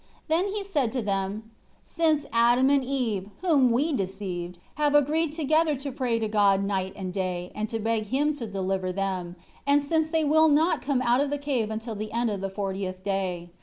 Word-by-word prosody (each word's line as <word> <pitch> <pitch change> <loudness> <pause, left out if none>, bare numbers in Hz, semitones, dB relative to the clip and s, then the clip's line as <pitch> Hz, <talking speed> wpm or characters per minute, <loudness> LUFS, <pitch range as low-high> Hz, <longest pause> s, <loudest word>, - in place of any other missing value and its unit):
Then 335 +5 +2
he 405 0 -3
said 295 - 0
to 255 - -1
them, 200 +2 -3 0.3
"Since 310 -3 +1
Adam 240 +3 +4
and 280 -2 +3
Eve, 235 -7 -2
whom 295 -9 +4
we 290 +7 +1
deceived, 185 -4 -4 0.2
have 295 -1 +3
agreed 300 +2 +3
together 310 0 +2
to 275 +1 -5
pray 250 -3 -1
to 225 -1 -1
God 200 -2 +3
night 190 -1 -2
and 185 -2 -5
day, 180 -2 -3
and 215 0 -3
to 225 - -2
beg 220 -1 -1
Him 290 +6 +1
to 235 - -5
deliver 190 -2 -2
them, 185 -2 -3 0.3
and 285 +1 +5
since 315 +2 0
they 320 -1 +1
will 315 +2 +5
not 315 +4 +3
come 265 -2 0
out 245 +2 +3
of 285 - 0
the 290 - -1
cave 270 -6 -1
until 220 +1 -4
the 215 +1 -5
end 235 -1 0
of 200 -2 -4
the 195 - -2
fortieth 190 -1 -4
day. 185 -3 -2
230 Hz, 205 wpm, -26 LUFS, 195-290 Hz, 0.3 s, and